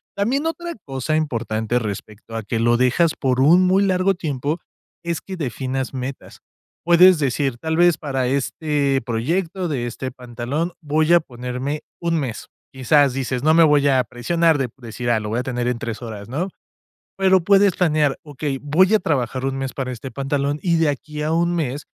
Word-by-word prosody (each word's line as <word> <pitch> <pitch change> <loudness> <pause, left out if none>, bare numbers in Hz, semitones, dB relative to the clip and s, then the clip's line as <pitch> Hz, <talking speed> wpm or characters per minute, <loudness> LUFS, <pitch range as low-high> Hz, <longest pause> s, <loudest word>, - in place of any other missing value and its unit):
También 245 +9 0
otra 340 +1 -3
cosa 135 +3 -2
importante 115 -6 -1
respecto 110 +1 -7
a 115 - -3
que 115 +2 -2
lo 120 +1 +3
dejas 130 +7 +3
por 130 -2 +1
un 170 +7 +6
muy 190 +2 +3
largo 190 0 +2
tiempo, 155 -2 -3 0.4
es 170 -1 -2
que 190 - -7
definas 130 -3 -3
metas. 130 +1 -6 0.5
Puedes 175 +1 +7
decir, 135 -2 0
tal 160 +5 -2
vez 175 -2 +5
para 135 -5 -2
este 140 0 0
proyecto 165 +10 -1
de 125 -6 -2
este 130 +2 -5
pantalón, 125 +7 -4
voy 155 +2 +1
a 175 - +7
ponerme 125 +1 -5 0.2
un 170 -1 0
mes. 125 -6 -4 0.3
Quizás 135 +1 +3
dices 130 0 -2
no 155 - +4
me 165 - +7
voy 145 -2 +4
a 130 -2 +4
presionar 165 +7 +1
de 135 -3 -1
decir: 120 0 -5
"Ah, 115 -2 +3
lo 105 -1 -5
voy 115 +3 -1
a 125 - -2
tener 125 -2 -2
en 125 -1 -1
tres 115 -1 -5
horas", 110 -3 -8
no? 170 +10 -2 0.7
Pero 190 -2 +4
puedes 200 -1 +4
planear: 155 -5 +2
"Okey, 145 -1 -4
voy 185 +8 +3
a - - +6
trabajar 130 - -1
un 135 0 -1
mes 135 -1 -4
para 130 -2 -3
este 125 +2 -7
pantalón 140 +1 -1
y 170 -2 +2
de 160 -2 +3
aquí 150 +1 -4
a 155 +1 -1
un 170 +1 +1
mes 145 -4 -2
140 Hz, 190 wpm, -21 LUFS, 125-165 Hz, 0.7 s, Puedes